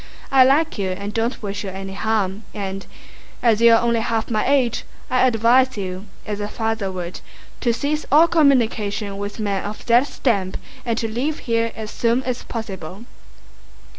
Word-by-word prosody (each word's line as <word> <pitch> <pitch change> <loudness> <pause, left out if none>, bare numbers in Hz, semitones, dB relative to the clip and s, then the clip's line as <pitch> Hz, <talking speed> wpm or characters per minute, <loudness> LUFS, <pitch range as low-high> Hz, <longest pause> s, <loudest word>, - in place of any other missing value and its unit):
I 265 -1 +7
like 280 0 +2
you 190 -2 0
and 200 +3 -4
don't 230 +2 -1
wish 205 0 -4
you 195 - -4
any 195 0 -6
harm 205 -1 -1
and—as 205 +3 -3
you 235 0 +7
are - - +3
only 235 -1 +2
half 225 0 -1
my 215 -1 +1
age—I 255 -1 +1
advise 245 +2 +3
you, 190 0 -5 0.2
as 210 -1 -4
a 205 - -2
father 220 -2 -2
would, 180 -1 -5 0.4
to 240 - +1
cease 290 +6 -1
all 315 +4 +7
communication 220 -10 +2
with 205 +2 -5
men 200 -3 -1
of 210 +1 -7
that 240 +3 +4
stamp 200 -10 -1 0.3
and 230 -1 0
to 230 - -1
leave 255 +8 -2
here 230 -1 +1
as 220 -1 -6
soon 235 +2 +1
as 250 -1 -3
possible." 200 -3 -7
225 Hz, 165 wpm, -21 LUFS, 200-245 Hz, 0.4 s, I